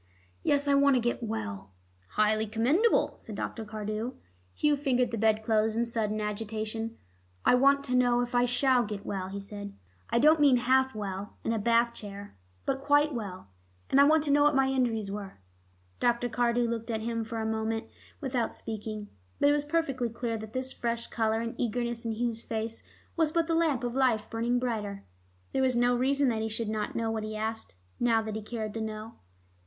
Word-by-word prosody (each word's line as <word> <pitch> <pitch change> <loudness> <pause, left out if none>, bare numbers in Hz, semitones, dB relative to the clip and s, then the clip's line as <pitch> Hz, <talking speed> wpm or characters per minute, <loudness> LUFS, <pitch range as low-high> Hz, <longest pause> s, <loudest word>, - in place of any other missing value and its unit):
"Yes. 285 0 +2
I 280 - +4
want 280 -1 +5
to - - +4
get 240 +2 -1
well." 100 - -4 0.4
"Highly 215 +1 +2
commendable," 270 - +2
said - - -9
Dr. 225 - -4
Cardew. 215 +3 -4 0.4
Hugh 295 -1 +3
fingered 255 -4 +1
the 230 - -2
bed 220 0 +3
clothes 220 0 +2
in 235 - +2
sudden 220 -2 -1
agitation. 220 +2 -3 0.5
"I - - +6
want 275 +2 +5
to 255 -2 -1
know 245 -1 +4
if 245 0 -3
I 245 0 +4
shall 250 0 +3
get 210 -2 -6
well," 190 -2 -3
he 200 +1 -5
said. 200 0 -8 0.3
"I - - +1
don't 305 +5 +6
mean 285 -3 +6
half 260 +1 +2
well, 200 -1 -5
in 225 - 0
a 225 - 0
Bath 235 +2 +3
chair, 205 -2 -9 0.3
but 270 0 -1
quite 290 +1 +3
well. 195 - -6 0.4
And 275 - +6
I - - +8
want 310 +1 +4
to 290 - 0
know 290 +1 +5
what 295 0 +4
my 270 0 +3
injuries 230 -6 0
were." 200 -1 -6 0.6
Dr. 240 0 +1
Cardew 240 0 +1
looked 230 0 -3
at 220 -1 -1
him 230 0 -2
a 225 -1 -2
moment 220 +1 -1 0.3
without 250 -5 -1
speaking. 215 -1 -5 0.3
But 285 - +5
it - - +5
was 295 0 0
perfectly 280 -6 0
clear 230 0 -3
that 220 0 -7
this 255 0 -3
fresh 235 0 -2
color 225 -1 +1
and 230 0 -3
eagerness 235 0 -1
in 225 - -1
Hugh's 230 0 -1
face 225 0 -4 0.3
was 320 -2 +2
but 335 0 +2
the 330 - -1
lamp 320 -7 +2
of 240 -1 -2
life 250 -5 +1
burning 235 +2 +1
brighter. 215 -5 -3 0.5
There - - 0
was 260 -1 +2
no 245 +1 +3
reason 275 +3 +2
that 225 -2 -1
he 220 - -1
should 220 0 -3
not 215 -1 -2
know 225 -1 0
what 220 -1 -2
he 215 0 -5
asked, 220 - -4 0.2
now 230 -2 +3
that 215 -1 -4
he 220 - -3
cared 215 -1 -5
to 225 - -3
know. 220 +1 -6
230 Hz, 200 wpm, -29 LUFS, 220-255 Hz, 0.6 s, I